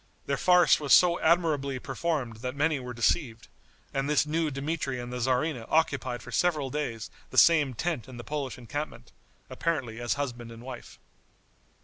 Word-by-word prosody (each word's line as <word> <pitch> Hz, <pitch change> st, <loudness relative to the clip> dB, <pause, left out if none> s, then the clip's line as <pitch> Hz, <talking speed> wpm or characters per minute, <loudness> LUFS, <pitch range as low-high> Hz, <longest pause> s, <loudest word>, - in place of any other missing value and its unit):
The -, -, 0 dB
farce 180 Hz, -1 st, +5 dB
was 145 Hz, -2 st, +2 dB
so 175 Hz, -1 st, +6 dB
admirably 155 Hz, -5 st, +2 dB
performed 130 Hz, -5 st, -3 dB
that 125 Hz, +3 st, -5 dB
many 150 Hz, 0 st, +1 dB
were 125 Hz, -1 st, -7 dB
deceived, 120 Hz, -1 st, 0 dB, 0.5 s
and 135 Hz, +1 st, -1 dB
this 150 Hz, 0 st, +3 dB
new 160 Hz, +1 st, 0 dB
Dmitri 140 Hz, -2 st, -3 dB
and 120 Hz, 0 st, -6 dB
the 125 Hz, -, -3 dB
tzarina 125 Hz, +1 st, 0 dB
occupied 140 Hz, -6 st, 0 dB
for 125 Hz, -, -10 dB
several 150 Hz, 0 st, +1 dB
days 120 Hz, -7 st, -4 dB, 0.2 s
the -, -, -8 dB
same 150 Hz, -6 st, +5 dB
tent 165 Hz, -2 st, -2 dB
in 130 Hz, -2 st, -10 dB
the 120 Hz, -, -7 dB
Polish 145 Hz, -2 st, -4 dB
encampment, 130 Hz, -, -6 dB, 0.4 s
apparently 125 Hz, -9 st, -2 dB
as 120 Hz, -, 0 dB
husband 120 Hz, -5 st, -4 dB
and 115 Hz, +1 st, -11 dB
wife. 130 Hz, -1 st, -9 dB
135 Hz, 165 wpm, -28 LUFS, 125-155 Hz, 0.5 s, so